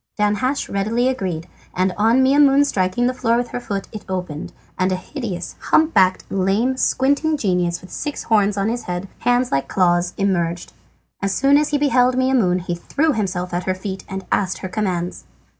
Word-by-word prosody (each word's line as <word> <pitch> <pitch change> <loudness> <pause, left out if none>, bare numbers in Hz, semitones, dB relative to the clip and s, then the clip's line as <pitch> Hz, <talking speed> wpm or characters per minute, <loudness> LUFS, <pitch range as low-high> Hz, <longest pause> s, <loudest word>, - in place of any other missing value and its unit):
Danhasch 210 +7 0
readily 220 +5 0
agreed, 185 -10 -3 0.3
and 185 0 +1
on 230 +5 +3
Maimoune 280 +1 +5
striking 190 -1 0
the 250 - +1
floor 235 -2 +1
with 245 0 -2
her - - -4
foot 200 -5 -4
it 215 - -8
opened, 180 -5 -4 0.2
and 185 +1 0
a - - +1
hideous, 185 - -5
hump 315 +1 +2
backed, 185 -2 +3
lame, 195 +7 +1
squinting 285 +4 +1
genius, 180 -7 0
with 185 - -14
six 295 - -4
horns 205 -2 +2
on 200 +1 0
his 240 +2 -3
head, 180 +2 -4
hands 245 +1 +1
like 135 - 0
claws, 175 -1 +1
emerged. 175 -4 -1 0.5
As 195 -1 0
soon 275 +1 +4
as 300 +1 +3
he 295 - +1
beheld 255 -3 +3
Maimoune 250 -9 +2
he 175 0 -3
threw 285 - 0
himself 185 -5 -2
at 175 +1 -2
her 185 - 0
feet 190 0 -6
and 190 0 -5
asked 190 -2 0
her - - -4
commands. 180 -3 -3
200 Hz, 185 wpm, -20 LUFS, 185-255 Hz, 0.5 s, Maimoune